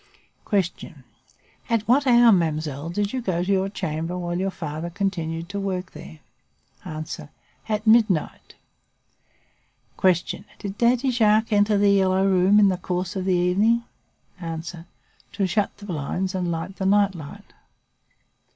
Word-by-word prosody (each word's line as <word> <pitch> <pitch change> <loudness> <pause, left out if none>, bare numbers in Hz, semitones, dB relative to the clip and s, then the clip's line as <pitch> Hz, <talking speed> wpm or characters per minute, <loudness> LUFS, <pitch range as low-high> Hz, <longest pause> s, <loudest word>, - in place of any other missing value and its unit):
"Q. 200 -2 +3 1.1
At 230 -2 0
what 270 +4 +3
hour, 240 -1 +7
mademoiselle, 155 -4 0
did 205 +5 -2
you 260 - -2
go 180 -6 -1
to 190 - -1
your 195 0 +1
chamber 165 -2 -4
while 175 -1 -3
your 195 +1 0
father 160 -2 -5
continued 170 -3 -3
to 200 0 -4
work 185 -2 -3
there? 75 +3 -12 0.6
"A. 155 0 -6 0.6
At 215 0 -1
midnight. 220 -7 +2 1.5
"Q. 185 -1 +5 0.4
Did 200 0 -7
Daddy 245 +2 +3
Jacques 220 -1 +3
enter 205 0 +3
"The 200 0 +4
Yellow 190 -1 +3
Room" 190 +2 +4
in 200 -1 +6
the 185 - 0
course 180 +1 -3
of 190 -1 -3
the 185 -1 +2
evening? 200 +7 +2 0.6
"A. 165 -1 -4 0.7
To 200 - 0
shut 205 +3 -1
the 205 - -11
blinds 180 +2 -3
and 180 -2 -1
light 170 +4 -5
the 190 - -1
night 200 0 +3
light. 155 -5 -11
190 Hz, 145 wpm, -23 LUFS, 175-205 Hz, 1.5 s, hour